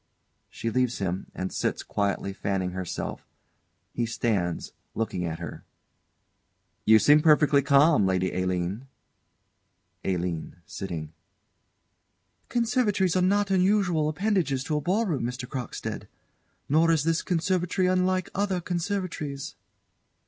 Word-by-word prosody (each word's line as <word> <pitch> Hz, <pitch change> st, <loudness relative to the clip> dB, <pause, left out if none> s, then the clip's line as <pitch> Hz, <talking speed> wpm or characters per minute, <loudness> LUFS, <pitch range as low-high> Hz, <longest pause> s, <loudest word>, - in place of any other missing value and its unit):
[She 115 Hz, -, -4 dB
leaves 125 Hz, +1 st, +1 dB
him, 95 Hz, -1 st, -3 dB
and 95 Hz, 0 st, -4 dB
sits, -, -, -1 dB
quietly 100 Hz, -1 st, -1 dB
fanning 95 Hz, -2 st, -2 dB
herself; 95 Hz, -1 st, -5 dB, 0.7 s
he 120 Hz, -1 st, -1 dB
stands, 100 Hz, -7 st, -1 dB, 0.2 s
looking 110 Hz, -5 st, -2 dB
at 80 Hz, -1 st, -3 dB
her.] -, -, -7 dB, 1.2 s
You 110 Hz, 0 st, +7 dB
seem 150 Hz, +7 st, +6 dB
perfectly 150 Hz, -2 st, +5 dB
calm, 140 Hz, -5 st, +5 dB
Lady 95 Hz, -1 st, 0 dB
Aline? 90 Hz, +6 st, -2 dB, 1.2 s
ALINE. 90 Hz, -4 st, -2 dB
[Sitting.] 80 Hz, -5 st, -6 dB, 1.4 s
Conservatories 225 Hz, -7 st, +1 dB
are 185 Hz, -, +3 dB
not 200 Hz, +2 st, +2 dB
unusual 185 Hz, -5 st, +2 dB
appendages 175 Hz, -6 st, 0 dB
to 155 Hz, -, -2 dB
a -, -, -1 dB
ball 195 Hz, +9 st, +1 dB
room, 160 Hz, -, -1 dB
Mr. 125 Hz, +1 st, -4 dB
Crockstead; 125 Hz, -3 st, -5 dB, 0.6 s
nor 160 Hz, +4 st, +4 dB
is 160 Hz, -3 st, +3 dB
this 165 Hz, +1 st, +1 dB
conservatory 180 Hz, +1 st, 0 dB
unlike 185 Hz, 0 st, +1 dB
other 195 Hz, -2 st, 0 dB
conservatories. 175 Hz, -5 st, -3 dB
145 Hz, 115 wpm, -27 LUFS, -, 1.4 s, You